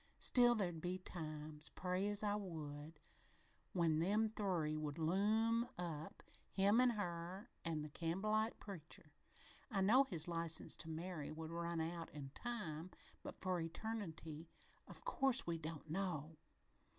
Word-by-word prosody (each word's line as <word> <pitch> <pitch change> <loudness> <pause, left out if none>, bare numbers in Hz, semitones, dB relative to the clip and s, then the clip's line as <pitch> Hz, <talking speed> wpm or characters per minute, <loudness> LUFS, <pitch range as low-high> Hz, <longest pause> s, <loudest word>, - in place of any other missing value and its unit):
Still, 240 -1 +7
there'd 175 -7 -1
be 180 +2 -1
times, 155 -4 -5
pray 185 +2 -1
as 205 0 +4
I 205 -1 +2
would, 155 -6 -5 0.7
when 165 -4 +3
them 210 +6 +3
three 180 -8 0
would 155 -1 -3
loom 215 +8 +3
up, 160 -3 -4 0.3
him 205 +5 +5
an' 255 - +6
her 180 +3 -4
an' 160 -2 -1
the - - -4
Campbellite 205 +8 0
preacher. 160 -6 -8 0.6
I 200 -6 +1
know 245 +8 +7
his 170 -9 -3
license 165 -1 +2
to 160 - -7
marry 160 -1 -4
would 160 +1 -5
run 170 0 -1
out 165 +1 -2
in 140 -2 -6
time, 185 - -4 0.3
but - - -8
for 185 -1 +1
eternity, 165 -3 -4 0.4
of - - -10
course 270 - +4
we 170 -1 -1
don't 160 0 -5
know. 160 -3 -2
170 Hz, 140 wpm, -41 LUFS, 160-205 Hz, 0.7 s, Still